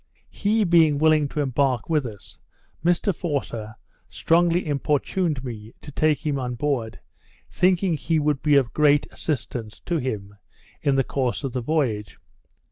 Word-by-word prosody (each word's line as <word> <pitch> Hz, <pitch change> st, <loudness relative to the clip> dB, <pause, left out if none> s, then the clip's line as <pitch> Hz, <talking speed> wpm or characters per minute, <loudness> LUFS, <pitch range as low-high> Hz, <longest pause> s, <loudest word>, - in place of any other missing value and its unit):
He 215 Hz, +2 st, +1 dB
being 165 Hz, -5 st, +4 dB
willing 155 Hz, -1 st, +3 dB
to 150 Hz, -, -3 dB
embark 130 Hz, -3 st, 0 dB
with 150 Hz, -5 st, +1 dB
us, 105 Hz, -4 st, -12 dB, 0.4 s
Mr 175 Hz, +2 st, +2 dB
Forster 120 Hz, -10 st, -4 dB, 0.3 s
strongly 170 Hz, +1 st, +2 dB
importuned 150 Hz, +1 st, 0 dB
me 115 Hz, -3 st, -8 dB
to 145 Hz, -, -11 dB
take 155 Hz, +2 st, +1 dB
him 145 Hz, -2 st, 0 dB
on 125 Hz, -1 st, -3 dB
board, 120 Hz, -4 st, -2 dB, 0.5 s
thinking 185 Hz, 0 st, +2 dB
that 155 Hz, -, -1 dB
he 165 Hz, -, 0 dB
would 150 Hz, -2 st, 0 dB
be 150 Hz, -1 st, +3 dB
of 130 Hz, -4 st, +2 dB
great 145 Hz, -1 st, +4 dB
assistance 120 Hz, -7 st, -4 dB
to 175 Hz, -, -1 dB
him 105 Hz, -6 st, -4 dB, 0.5 s
in 140 Hz, -2 st, +2 dB
the 135 Hz, -, +3 dB
course 130 Hz, 0 st, -2 dB
of 135 Hz, -3 st, -3 dB
the 125 Hz, -, -2 dB
voyage. 120 Hz, -7 st, -1 dB
145 Hz, 155 wpm, -24 LUFS, 125-160 Hz, 0.5 s, being